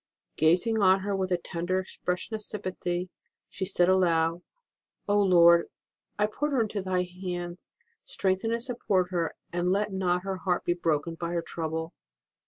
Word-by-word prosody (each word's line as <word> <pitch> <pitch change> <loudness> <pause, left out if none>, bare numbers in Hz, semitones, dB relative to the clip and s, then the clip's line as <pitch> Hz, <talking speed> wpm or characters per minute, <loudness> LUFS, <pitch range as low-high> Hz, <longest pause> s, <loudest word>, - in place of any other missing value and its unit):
Gazing 180 +8 +3
on 190 0 +5
her 200 +1 -1
with 190 -1 -2
a 180 - +3
tender 175 +1 -2
ex 185 - -7
pression 180 +4 -3
of 215 - -3
sympathy, 185 -3 -3 0.4
she 190 - -3
said 180 -2 +3
aloud: 170 -2 +2 0.7
Oh, 205 0 +3
Lord, 170 -3 +6 0.5
I 210 - +3
put 280 +8 -2
her 265 -4 +2
into 210 -2 -3
Thy 185 -1 0
hands; 180 -1 -6 0.3
strengthen 190 +3 -1
and 230 0 -1
support 195 -7 0
her, 170 -2 -1 0.2
and 175 +1 +1
let 205 +1 0
not 180 -1 0
her 195 -1 -3
heart 180 -1 -1
be 175 - +2
broken 165 -2 -1
by 170 +1 -4
her 170 -1 -1
trouble. 160 0 -4
185 Hz, 170 wpm, -28 LUFS, 175-195 Hz, 0.7 s, Lord